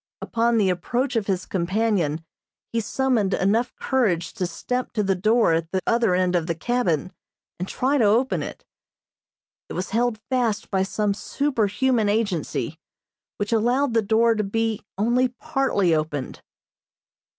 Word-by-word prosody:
Upon 235 0 +1
the 195 -4 +3
approach 245 +9 -1
of 220 -3 0
his 190 -2 -1
companion 180 -4 0 0.5
he 230 - +1
summoned 230 -3 +1
enough 220 +6 +1
courage 210 -11 0
to 185 -5 -2
step 250 +8 -3
to 215 -3 0
the 195 -1 +2
door 215 0 +3
at 165 0 -1
the 190 - +1
other 230 -5 +2
end 180 0 +1
of 170 -2 0
the 170 - -1
cabin, 185 - -1 0.5
and 180 - -3
try 275 +7 0
to 225 - +4
open 235 +6 +2
it. - - -7 1.0
It - - -6
was 185 +1 -4
held 235 +1 +1
fast 240 -5 0
by 190 -2 +2
some 205 +1 0
superhuman 235 -1 0
agency, 205 -7 -1 0.6
which 205 +2 -2
allowed 245 +4 +2
the 225 - +3
door 225 +2 +3
to 215 -1 -1
be 225 +1 -1 0.2
only 240 +5 +2
partly 250 - 0
opened. 155 -3 -2
215 Hz, 150 wpm, -24 LUFS, 185-240 Hz, 1.0 s, to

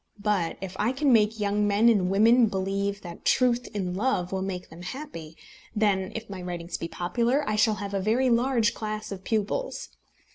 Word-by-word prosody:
But 200 -6 0
if 190 -1 -6
I 225 +5 +1
can 270 -1 +2
make 220 0 +3
young 205 0 +1
men 205 +3 +3
and 200 -6 +4
women 225 +5 +5
believe 200 +1 -2
that 170 -2 -10
truth 245 -1 +2
in 185 -3 -3
love 185 -3 0
will 190 -1 -2
make 185 -2 -4
them 165 +2 -11
happy, 180 - -8 0.4
then, 200 -3 +1
if 225 0 -5
my 195 -2 -7
writings 175 -1 -5
be 165 - -4
popular, 235 - 0
I 215 - 0
shall 215 0 +3
have 200 0 -6
a 195 - 0
very 240 +6 +2
large 235 -2 +2
class 215 -1 -5
of 190 -1 -7
pupils. 220 - -2
210 Hz, 190 wpm, -26 LUFS, 190-230 Hz, 0.4 s, women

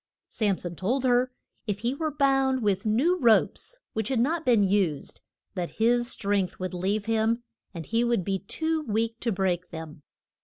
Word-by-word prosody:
] - - -67
Sam 205 -4 0
son 175 -1 -6
told 245 +10 -1
her 250 0 +3 0.4
if 205 -1 -2
he 240 +3 0
were 310 +3 -2
bound 270 -3 +2
with 200 0 +1
new 300 +13 +2
ropes, 240 - +2 0.2
which 220 -1 -2
had 260 -3 +1
not 315 +7 +1
been 240 -7 +4
used, 190 -7 0 0.3
that 175 -2 -3
his 240 +2 +3
strength 200 -5 -1
would 185 0 -4
leave 195 +4 -1
him, 225 +1 +1 0.3
and 170 -4 -7
he 230 +1 +1
would 235 -5 +1
be 195 +1 -1
too 320 - -2
weak 230 -2 -1
to 235 - -1
break 185 -2 -1
them. 160 -2 -8
220 Hz, 185 wpm, -27 LUFS, 190-250 Hz, 0.4 s, been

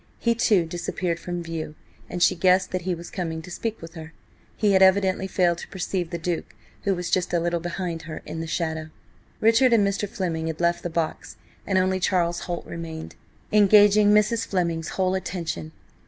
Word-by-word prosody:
He, 235 - +2
too, 210 -6 +3
disappeared 170 +1 -3
from 175 0 -4
view, 160 -2 -5 0.3
and 175 0 0
she - - +5
guessed 185 +1 +3
that 185 - -1
he 180 0 -1
was 170 +1 -10
coming 165 -4 -3
to 180 - -10
speak 225 +4 -3
with 165 0 -9
her. 160 -1 -9 0.4
He 210 -2 +3
had 190 -1 +4
evidently 190 0 +4
failed 175 -3 +1
to - - -8
perceive 180 -2 -3
the 170 - -3
Duke, 170 0 -4 0.3
who 195 -1 +2
was 175 -1 -4
just 180 -1 +1
a - - +3
little 170 0 0
behind 170 -1 -4
her 155 - -7
in 160 - -6
the 165 - -5
shadow. 160 -1 -2 0.5
Richard 230 +3 +5
and 205 -3 +4
Mr. 200 +1 -2
Fleming 165 -5 -2
had 160 -1 -4
left 170 0 +1
the 175 - -3
box, 165 -1 -3 0.3
and 195 - +2
only 185 0 +2
Charles 175 -2 +1
Holt 175 - -3
remained, 165 -1 -7 0.4
engaging 205 0 +6
Mrs. 210 +2 +3
Fleming's 170 -4 -1
whole 185 -1 +2
attention. 170 - -4
175 Hz, 195 wpm, -24 LUFS, 165-190 Hz, 0.5 s, engaging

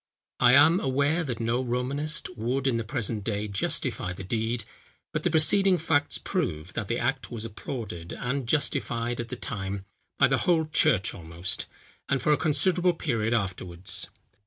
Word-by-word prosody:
I 125 0 +6
am, 155 +6 +7
aware, 145 +5 +1
that 125 -7 -4
no 115 +2 0
Romanist 130 +3 -1
would 125 +4 -1
in 130 -4 +2
the 115 - -2
present 110 -3 -2
day 105 0 -2
justify 95 -2 -1
the 95 - -8
deed; 115 +3 -1 0.5
but - - -1
the - - +1
preceding 180 +4 +6
facts 150 -3 +1
prove, 90 - -3
that - - -3
the - - -1
act - - -1
was 115 -2 -6
applauded 105 -6 -6
and 130 0 -3
justified 120 -4 0
at 120 -1 -4
the 125 - -4
time 100 -4 -4 0.3
by - - +5
the - - +1
whole 165 -3 +2
church 110 -10 +2
almost, 85 0 -3 0.4
and 135 - +2
for 150 - +1
a 150 - +5
considerable 175 +4 +2
period 115 -8 0
afterwards. 90 -3 -2
120 Hz, 165 wpm, -27 LUFS, 105-145 Hz, 0.5 s, am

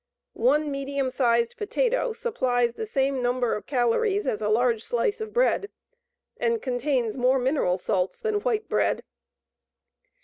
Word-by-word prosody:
One 305 -11 +2
medium 275 -1 -2
sized 235 -3 +1
potato - - 0
supplies 255 - 0
the 440 - -5
same 270 - 0
number 245 -1 0
of 210 - -5
calories 295 - +1
as 210 - -1
a 210 - 0
large 230 0 +2
slice 405 - -1
of 435 -1 -5
bread, 480 -4 +1 0.7
and 465 -1 0
contains 255 - -1
more 255 +1 +3
mineral 255 -8 +1
salts 185 0 -1
than 435 -3 -1
white 440 -2 -1
bread. - - 0
270 Hz, 140 wpm, -25 LUFS, -, 0.7 s, more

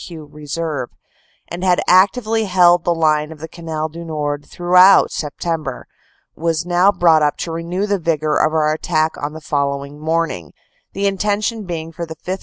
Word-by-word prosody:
Q. 160 -3 -10
Reserve, 150 -2 -5 0.6
and 175 +2 -6
had 180 -2 +3
actively 215 +4 +3
held 175 -2 +4
the 175 - +1
line 155 -1 +1
of 160 - -10
the 160 +2 -8
Canal 160 -2 -5
du 165 +2 -9
Nord 150 -3 -4
through 175 0 -2
out 185 +2 +7
September, 150 -2 -4 0.5
was 165 0 -1
now 180 +3 +3
brought 165 -5 +4
up 150 -1 +1
to 170 - -4
renew 170 +4 -3
the 200 -1 -1
vigor 155 -2 0
of 155 - +2
our 155 -1 +1
attack 155 0 0
on 145 +1 -3
the 160 - -9
following 140 -1 -3
morning, 155 - -2 0.4
the 200 +1 -2
intention 205 +2 -1
being 165 -2 -5
for 170 +1 -6
the 160 - -8
5th. 185 +4 -5
165 Hz, 180 wpm, -18 LUFS, 155-180 Hz, 0.6 s, out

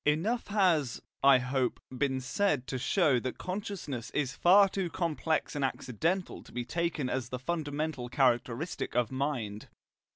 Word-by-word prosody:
Enough 180 +12 +1
has, 175 - +2 0.2
I 135 -1 +8
hope, 125 0 -1 0.2
been 130 0 0
said 130 +1 0
to 130 -1 -3
show 145 -2 +3
that 130 +2 -4
consciousness 185 - -4
is 135 -3 0
far 195 +3 +6
too 190 -2 -2
complex 160 -2 -1
and 145 - -1
accidental 160 - -1
to - - -16
be 120 0 -3
taken 170 -1 -1
as 125 -1 -2
the 125 - -3
fundamental 150 -2 -3
characteristic 125 +3 0
of 120 -1 +1
mind. 130 -7 -3
145 Hz, 150 wpm, -30 LUFS, 125-170 Hz, 0.2 s, I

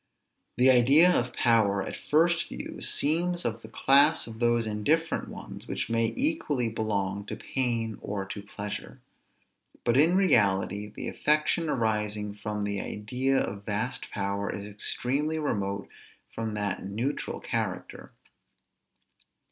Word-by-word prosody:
The 130 +1 +6
idea 140 +8 +6
of 125 -7 +1
power, 105 -4 +3
at - - -6
first 170 +3 +2
view, - - -7
seems 175 +4 +1
of 115 0 -2
the 110 - -10
class 140 +7 +4
of 115 -1 -10
those 120 -1 +2
indifferent 145 +11 0
ones, - - -9
which - - -3
may 115 0 +1
equally 255 - 0
belong 100 -3 -2
to - - -4
pain 115 -4 -2
or 100 -1 -4
to 100 +1 -6
pleasure. 100 0 -7 0.8
But 120 +1 +2
in 165 +6 +5
reality, 105 - +2
the 105 - -7
affection 155 +2 +1
arising 105 -4 -1
from 105 0 -4
the 100 -1 -2
idea 125 +6 -1
of 100 -4 -2
vast 105 +1 -3
power 100 +1 -2
is 100 - -6
extremely 135 +9 +1
remote 100 -9 -2 0.5
from 110 -1 -3
that 105 -2 -2
neutral 115 +9 -3
character. - - -4
115 Hz, 130 wpm, -28 LUFS, 105-140 Hz, 0.8 s, The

